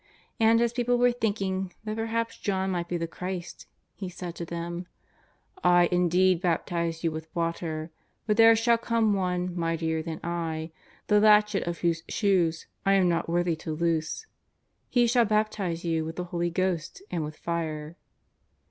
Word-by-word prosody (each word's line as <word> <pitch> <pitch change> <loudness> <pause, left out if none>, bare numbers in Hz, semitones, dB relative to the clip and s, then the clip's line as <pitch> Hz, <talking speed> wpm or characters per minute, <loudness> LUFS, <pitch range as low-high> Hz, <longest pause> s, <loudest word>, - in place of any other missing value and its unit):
And 225 +1 +5
as 235 0 +1
people 245 0 +1
were 245 0 +4
thinking 195 -5 -2
that 215 -1 -3
perhaps 230 +1 -2
John 190 -2 -1
might 175 -2 -2
be 175 - -2
the 165 - -2
Christ, 180 +1 -6 0.3
he 190 -3 -6
said 180 -1 -7
to 170 - -6
them: 170 +1 -5 0.4
" - - -40
I 175 -1 +5
indeed 180 0 +3
baptize 170 -1 -1
you 165 - +1
with 160 +1 -7
water, 165 -1 -2 0.3
but 210 - +2
there 225 0 +7
shall 230 +1 +3
come 230 -2 +2
One 180 -2 -1
mightier 165 -1 -1
than 160 0 -5
I, 165 -2 -3 0.3
the 210 0 +4
latchet 210 -2 +4
of 170 -1 -3
whose 170 -2 +1
shoes 180 -6 +1 0.2
I 195 - +3
am 190 -2 +4
not 170 -1 0
worthy 175 0 +1
to 155 0 -5
loose. 165 - -1 0.6
He 245 -1 +4
shall 240 0 +4
baptize 210 -5 -1
you 165 -1 0
Avith 160 +1 -5
the 180 - -3
Holy 175 0 0
Ghost 185 - -2
and 165 - -1
with 150 0 -7
fire." 160 -2 -3
180 Hz, 170 wpm, -27 LUFS, 165-210 Hz, 0.6 s, there